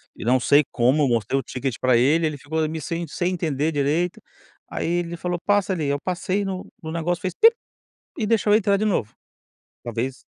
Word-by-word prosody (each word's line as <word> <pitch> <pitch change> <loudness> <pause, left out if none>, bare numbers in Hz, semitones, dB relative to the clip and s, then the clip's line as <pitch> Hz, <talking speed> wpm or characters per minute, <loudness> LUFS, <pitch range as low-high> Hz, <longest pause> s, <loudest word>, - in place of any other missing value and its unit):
e - - -8
não 125 +2 +4
sei 145 +4 +4
como, 135 +4 +3
mostrei 120 +3 +1
o - - -5
ticket 130 0 -3
pra 130 -2 +3
ele, 150 +7 +3
ele 150 -2 -4
ficou 160 +4 -4
ali 160 +1 -1
sem 165 +2 -4
sem 175 +4 -1
entender 160 -3 -1
direito, 150 +5 0 0.5
aí - - -3
ele 170 0 -1
falou: 175 0 -3
“Passa 205 -2 +2
ali,” 155 -5 -2
eu 140 0 0
passei 185 +2 -1
no 190 -1 -5 0.2
no 160 - -5
negócio 170 +2 -2
fez, 185 -2 -3
bip, 460 +1 +8 0.6
e 220 - -1
deixou 210 -1 +3
eu - - +7
entrar 200 -2 +2
de 215 - -1
novo. 175 - 0 0.7
Talvez 120 +3 -3
160 Hz, 205 wpm, -23 LUFS, 140-185 Hz, 0.7 s, bip